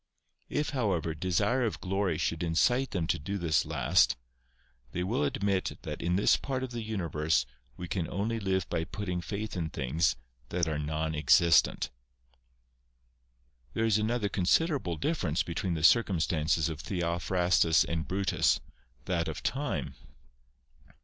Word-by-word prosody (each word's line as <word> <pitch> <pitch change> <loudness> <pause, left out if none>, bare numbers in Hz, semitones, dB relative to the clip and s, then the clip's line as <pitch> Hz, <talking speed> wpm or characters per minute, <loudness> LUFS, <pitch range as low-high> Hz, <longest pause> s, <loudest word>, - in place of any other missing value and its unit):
If, 150 0 -1
however, 100 - 0
desire 95 +10 +1
of 115 - -2
glory 95 -3 -1
should 80 0 -1
incite 120 +11 +2
them 90 -4 -2
to - - 0
do 100 +8 -4
this 80 -5 +1
last, 75 +1 +3 0.8
they 90 - -1
will 95 -4 0
admit 95 +6 -1
that - - -5
in 90 +1 0
this 100 - +4
part 130 -2 -3
of 130 - -5
the 120 -1 -4
universe 80 - 0 0.3
we 90 - -6
can 85 -1 -2
only 110 +4 -2
live 95 -3 0
by 80 - -1
putting 90 0 -4
faith 105 +4 -5
in 85 -3 -2
things 75 +3 0 0.3
that 85 -1 0
are 75 -1 -1
non 80 +1 -2
existent. 75 -2 +4 1.8
There 115 - +1
is 110 -1 +3
another 110 0 0
considerable 100 - +1
difference 90 - 0
between 85 +1 -2
the 80 - -4
circumstances 80 -6 +3
of 80 -3 -5
Theophrastus 85 -1 +2
and 80 -1 -3
Brutus, 95 +1 +1 0.5
that 85 -3 0
of 80 - -5
time. 130 - -2
90 Hz, 145 wpm, -30 LUFS, 80-100 Hz, 1.8 s, this